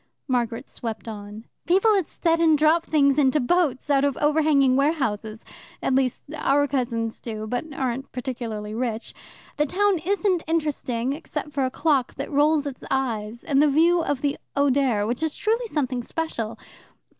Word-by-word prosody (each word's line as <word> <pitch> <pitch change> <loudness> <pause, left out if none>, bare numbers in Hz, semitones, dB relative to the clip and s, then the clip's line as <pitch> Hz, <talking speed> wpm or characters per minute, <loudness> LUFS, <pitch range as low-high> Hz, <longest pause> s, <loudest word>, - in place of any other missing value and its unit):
Margaret 240 -3 -1
swept 230 -1 -6
on. 210 0 -8 0.2
"People 390 +5 +4
at 380 -5 0
Stettin 330 -2 +2
drop 315 +3 +3
things 280 -2 +3
into 275 +1 +3
boats 280 -1 +1
out 275 -1 +3
of 285 -2 +1
overhanging 295 -3 +3
warehouses. 230 -7 -1 0.3
At - - 0
least, 260 -2 +1
our 285 -1 +2
cousins 235 -4 -2
do, 215 -2 -5
but 245 +8 -4
aren't 265 -1 -3
particularly 230 -5 -5
rich. 230 -1 -3 0.4
The 300 0 +2
town 400 +2 +2
isn't 380 +1 +1
interesting, 280 -6 -1
except 300 0 -6
for 275 -2 0
a - - 0
clock 275 -2 0
that 275 - -5
rolls 295 +1 +3
its 280 -3 -6
eyes, 235 -4 -2
and 280 -1 +2
the 300 - +5
view 335 +4 +4
of 290 -4 -2
the 285 -1 -1 0.2
Oder, 270 -6 +2
which 240 +5 -2 0.2
truly 455 +3 0
is 450 - -10
something 260 -5 -1
special. 235 -5 -4
275 Hz, 160 wpm, -24 LUFS, 240-310 Hz, 0.4 s, the